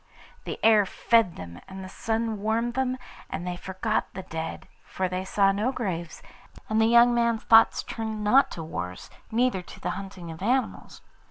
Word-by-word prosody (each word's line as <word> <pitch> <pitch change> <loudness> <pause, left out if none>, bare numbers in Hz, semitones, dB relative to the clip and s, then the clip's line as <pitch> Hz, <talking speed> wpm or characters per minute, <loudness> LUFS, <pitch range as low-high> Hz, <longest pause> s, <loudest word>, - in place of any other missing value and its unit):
The - - -4
air 215 -3 +6
fed 225 -6 +2
them 85 -1 -9
and 190 0 -8
the - - -7
sun 225 +1 -2
warmed 230 +3 0
them, 260 0 -1 0.3
and 175 - -4
they 180 -1 -3
forgot 190 +4 -2
the 190 - -5
dead, 160 -1 -6 0.2
for 190 - -2
they 185 +1 -3
saw 195 +1 +3
no 210 +6 0
graves, 175 -10 -4 0.5
and 220 0 +2
the 220 - +4
young 235 +1 +6
man's 235 -2 +1
thoughts 225 0 +5
turned 220 -1 -4
not 255 +7 +5
to 165 - -4
wars, 90 - -6 0.2
neither 235 -4 +1
to 180 - -13
the - - -2
hunting 190 -4 -7
of 160 - -10
animals. 250 +6 -1
210 Hz, 180 wpm, -26 LUFS, 185-230 Hz, 0.5 s, air